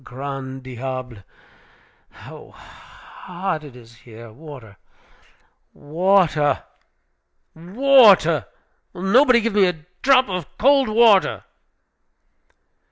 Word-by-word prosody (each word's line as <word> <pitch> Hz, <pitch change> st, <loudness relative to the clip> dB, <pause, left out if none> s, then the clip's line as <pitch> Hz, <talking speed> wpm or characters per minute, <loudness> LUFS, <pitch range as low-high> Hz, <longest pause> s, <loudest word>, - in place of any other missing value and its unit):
Ah, -, -, -25 dB
grand 135 Hz, 0 st, -8 dB
diable! 130 Hz, -1 st, -8 dB, 0.9 s
how -, -, -15 dB
hot 180 Hz, -3 st, -9 dB
it 140 Hz, -4 st, -14 dB
is 120 Hz, -1 st, -17 dB
here! 115 Hz, -1 st, -15 dB
Water, 130 Hz, -7 st, -14 dB, 1.0 s
water, 160 Hz, -2 st, 0 dB, 0.9 s
water! 190 Hz, -, +3 dB, 0.5 s
Will 180 Hz, -, -10 dB
nobody 240 Hz, +4 st, +3 dB
give 230 Hz, -1 st, -3 dB
me 200 Hz, -2 st, +3 dB
a 160 Hz, -4 st, -6 dB, 0.2 s
drop 260 Hz, -1 st, +3 dB
of 180 Hz, -7 st, -7 dB
cold 275 Hz, 0 st, +2 dB
water?" 215 Hz, -3 st, +2 dB
160 Hz, 95 wpm, -20 LUFS, 130-205 Hz, 1.0 s, water